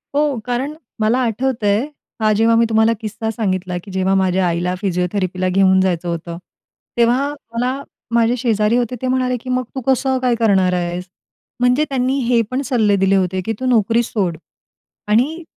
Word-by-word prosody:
हो. 290 -4 +1
कारण 250 +4 -2 0.3
मला 220 +4 +2
आठवतंय 230 -1 0 0.3
हा 215 0 +3
जेव्हा 225 +2 +3
मी 230 0 +4
तुम्हाला 220 0 +3
किस्सा 220 +1 -4
सांगितला 185 -5 -2
की 200 - -11
जेव्हा 190 0 0
माझ्या 190 -1 +2
आईला 175 +1 -1
फिजिओथेरपीला 185 -1 -1
घेऊन 190 0 +4
जायचं 180 -2 0
होतं. 170 0 -4 0.6
तेव्हा 245 +4 +3 0.2
मला 250 +4 -1 0.3
माझे 235 +1 +3
शेजारी 225 -2 +1
होते 245 0 -1
ते 260 - -1
म्हणाले 255 -1 0
की 255 - -8
"मग 255 0 0
तू 265 - -3
कसं 265 0 +2
काय 250 -2 +2
करणार 190 -5 +3
आहेस?" 175 0 -2 0.5
म्हणजे 250 +5 +3
त्यांनी 265 0 0
हे 240 -1 +3
पण 255 +2 -1
सल्ले 220 -7 +2
दिले 195 0 +2
होते 185 -1 0
की 225 - -1
"तू 260 - -3
नोकरी 230 -1 +3
सोड 190 -8 -2 0.7
आणि" 265 +11 +1
225 Hz, 170 wpm, -18 LUFS, 190-250 Hz, 0.7 s, मी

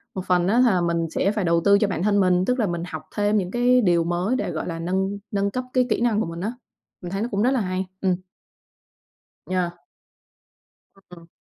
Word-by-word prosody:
Một 185 - -4
phần 180 0 +2
á, 230 +5 +3
là 215 -8 +4
mình 170 -1 0
sẽ 195 +4 0
phải 210 -4 -2
đầu 170 0 +2
tư 200 0 +6
cho 210 - +2
bản 180 -2 -2
thân 205 -1 +3
mình, 185 -1 +3
tức 250 0 0
là 215 - +2
mình 170 -1 -3
học 155 -3 -7
thêm 205 0 +2
những 185 -1 -1
cái 245 +1 +3
điều 175 -4 +3
mới 175 +8 0
để, - - -2
gọi - - -4
là, 165 -1 -4
nâng 190 +3 -1
nâng 200 0 0
cấp 255 0 -3
cái 250 -1 +2
kỹ 230 - 0
năng 225 -3 +2
của 195 - -1
mình 165 +1 -6
á. 215 +4 -2 0.5
Mình 175 0 -7
thấy 195 +1 -2
nó 235 - -1
cũng 200 +1 0
rất 255 - +3
là 260 - +1
hay. 185 0 -2 0.2
Ừm. 185 -2 +2 1.3
Yeah. 180 -2 -1 1.3
Ừm. 180 -3 -16
190 Hz, 230 wpm, -23 LUFS, 175-210 Hz, 1.3 s, tư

